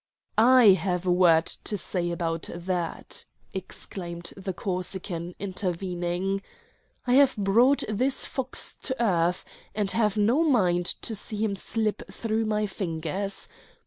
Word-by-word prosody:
"I 245 0 +7
have 185 -2 +2
a 180 - +2
word 170 -2 +5
to 210 - -3
say 175 -1 -2
about 165 -1 -2
that," 175 -1 -3 0.3
exclaimed 170 -3 -6
the 195 0 -4
Corsican, 180 -1 -3
intervening. 185 0 -2 0.6
"I 245 - +2
have 275 0 +5
brought 230 +8 +4
this 250 +6 +1
fox 260 -1 -2
to 260 -3 -3
earth, 180 -5 +1 0.3
and 205 -2 +1
have 215 -2 +1
no 230 +9 +3
mind 185 - +3 0.2
to 225 - -2
see 210 0 -2
him 210 -1 0
slip 215 +2 -1
through 225 0 -1
my 215 0 0
fingers. 190 0 -4
195 Hz, 130 wpm, -27 LUFS, 175-220 Hz, 0.6 s, I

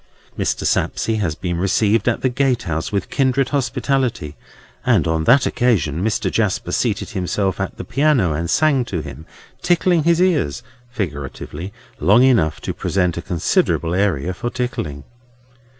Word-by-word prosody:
Mr. - - -1
Sapsea 110 -1 0
has 85 -7 -1
been 85 -1 -3
received 105 +3 +2
at 115 - -2
the 130 - +2
gatehouse 120 - -1
with 100 -2 -2
kindred 135 0 +1
hospitality; 130 - -1 0.5
and - - +3
on 80 -1 0
that 130 +2 +5
occasion 90 - +1
Mr. 105 -3 0
Jasper 105 -4 -1
seated - - -1
himself 95 +1 -1
at 95 - -4
the - - -5
piano, 125 - +2
and 85 +2 -3
sang 150 -4 +3
to 90 -8 -3
him, 75 +2 -10 0.3
tickling 175 -1 +2
his 170 +2 +2
ears—figuratively—long 105 - -1
enough 110 -13 +3
to - - -3
present 90 -3 0
a - - -3
considerable 85 -1 0
area 90 -4 0
for 120 +6 -4
tickling. 85 - -4
105 Hz, 140 wpm, -20 LUFS, 85-130 Hz, 0.5 s, that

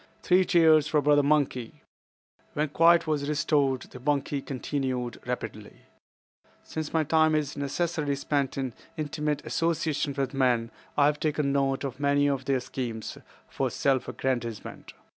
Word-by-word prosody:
"Three 185 +1 +4
cheers 160 -4 +5
for 150 +1 +2
Brother 145 0 +4
Monkey." 140 -5 0 0.7
When 150 0 -1
quiet 165 +3 +5
was 150 -2 -1
restored, 145 -3 +1
the 125 - -12
monkey 140 +1 -1
continued 130 -3 -3
rapidly: 110 -4 -6 0.8
"Since 155 -1 -5
my 160 -1 +2
time 155 +1 +3
is 150 -2 -1
necessarily 145 +1 -1
spent 140 -1 -1
in 130 -3 -2 0.2
intimate 150 -1 -2
association 155 -3 -1
with 135 -1 -1
men, 125 -4 +1 0.3
I 145 - +5
have 150 0 +2
taken 150 -2 0
note 135 -1 +1
of 135 -2 -5
many 145 0 +2
of 135 -2 -1
their 135 -2 +1
schemes 120 -4 -5 0.3
for - - -2
self 135 -2 0
aggrandizement. 120 -4 -4
140 Hz, 140 wpm, -27 LUFS, 130-150 Hz, 0.8 s, cheers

